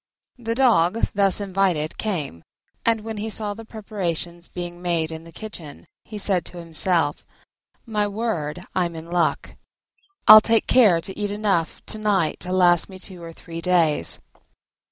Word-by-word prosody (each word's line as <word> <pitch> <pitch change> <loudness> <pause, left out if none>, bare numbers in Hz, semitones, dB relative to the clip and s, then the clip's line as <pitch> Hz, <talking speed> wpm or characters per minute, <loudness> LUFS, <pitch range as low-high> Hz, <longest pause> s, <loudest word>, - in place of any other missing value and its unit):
The 230 -1 -3
Dog 230 -6 +3
thus 200 -1 +2
invited 190 -6 0
came, 155 - -3 0.4
and 230 -1 +2
when 220 0 -6
he 215 +2 -3
saw 210 -1 -2
the 225 +2 -10
preparations 175 -6 -5
being 175 -1 -7
made 170 -3 -1
in 160 0 -8
the 165 - -12
kitchen 170 -8 -9 0.2
he 215 - -8
said 190 -4 +1
to 180 - -7
himself, 165 -2 +1 0.6
"My 210 -3 0
word, 185 -6 -3
I'm 175 -2 -1
in 165 +1 -9
luck: 175 -1 0 0.7
I'll 215 - +12
take 225 0 +2
care 205 -10 +5
to 190 - -6
eat 205 -1 -2
enough 200 -5 -1
to 215 - -2
night 200 -7 +1
to 180 - -4
last 175 -2 +4
me 190 - -10
two 185 -1 -9
or 165 0 -8
three 165 0 -9
days." 165 - +2
185 Hz, 160 wpm, -23 LUFS, 170-210 Hz, 0.7 s, I'll